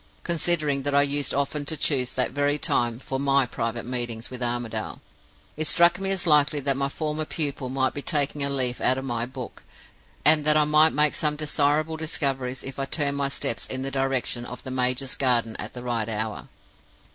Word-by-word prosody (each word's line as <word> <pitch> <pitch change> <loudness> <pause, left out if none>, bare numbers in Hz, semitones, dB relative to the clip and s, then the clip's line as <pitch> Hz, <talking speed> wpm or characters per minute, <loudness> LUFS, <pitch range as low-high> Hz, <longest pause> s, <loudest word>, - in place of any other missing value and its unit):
Considering 155 -4 +1
that 145 +1 -1
I 140 - +6
used 145 0 0
often 140 +1 -1
to 155 +2 -3
choose 130 -4 +1
that 125 - +1
very 145 0 +1
time 120 -4 0
for 135 +1 -5
my 140 -1 +3
private 115 -1 -4
meetings 120 -2 -4
with 125 -1 -7
Armadale, 120 -2 -3 0.6
it 155 0 -2
struck 170 +3 +4
me 195 0 -1
as 195 -2 0
likely 150 -2 +4
that 140 -1 +1
my 140 +1 -1
former 155 +1 -3
pupil 145 -4 -2
might 130 0 0
be 145 - -4
taking 145 0 0
a 140 - 0
leaf 130 -3 -1
out 130 - +3
of 135 - -5
my 120 -2 -2
book, 130 -1 -9 0.6
and 155 0 +5
that 150 +1 +5
I 155 - +5
might 155 +1 +5
make 150 0 +3
some 150 -1 0
desirable 150 +1 0
discoveries 135 -5 -2
if 135 0 -6
I 135 - 0
turned 140 -1 0
my 140 -1 0
steps 115 -4 -1
in 130 0 -3
the 135 - -3
direction 135 -2 -1
of 125 +1 -8
the 130 - -6
major's 130 +1 0
garden 120 -4 +1
at - - -6
the 125 - -8
right 115 -2 -2
hour. 110 -1 -4
140 Hz, 205 wpm, -25 LUFS, 125-150 Hz, 0.6 s, I